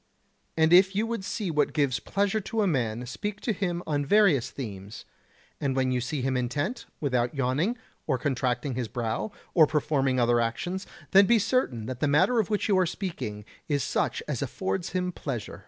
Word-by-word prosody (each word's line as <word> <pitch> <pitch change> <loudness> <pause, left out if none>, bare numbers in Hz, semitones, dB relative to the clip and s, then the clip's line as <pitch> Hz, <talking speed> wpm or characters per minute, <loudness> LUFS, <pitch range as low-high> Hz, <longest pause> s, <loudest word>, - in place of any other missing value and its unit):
And 160 +1 +4
if 190 +2 +6
you 215 +3 +1
would 230 -3 -3
see 190 -1 -3
what 150 -1 +1
gives 140 -5 +1
pleasure 200 - 0
to 220 +2 -1
a - - +2
man 125 - -1
speak 205 - -5
to 225 - 0
him 180 -3 -2
on 145 -2 0
various 150 - +4
themes, 105 -6 -8 0.5
and 135 -2 -1
when 130 -1 +1
you 125 -1 0
see 135 +1 -3
him 130 0 0
intent, 145 - -2
without 125 -3 0
yawning, 140 - 0 0.3
or 135 -4 +1
contracting 130 0 -1
his 120 -1 -2
brow, 115 - -3 0.2
or 160 -4 +6
performing 140 -4 +1
other 120 0 +3
actions, 175 +12 -3 0.2
then 195 0 +7
be 235 - +5
certain 200 - 0
that 125 0 -5
the 150 - +1
matter 185 +12 +3
of 215 - 0
which 210 -2 0
you 205 - +3
are 185 - +3
speaking 110 - -5 0.2
is 145 -3 0
such - - -1
as 145 -5 -2
affords 180 +6 -2
him 180 -1 0
pleasure. 125 -10 -5
145 Hz, 190 wpm, -27 LUFS, 125-190 Hz, 0.5 s, then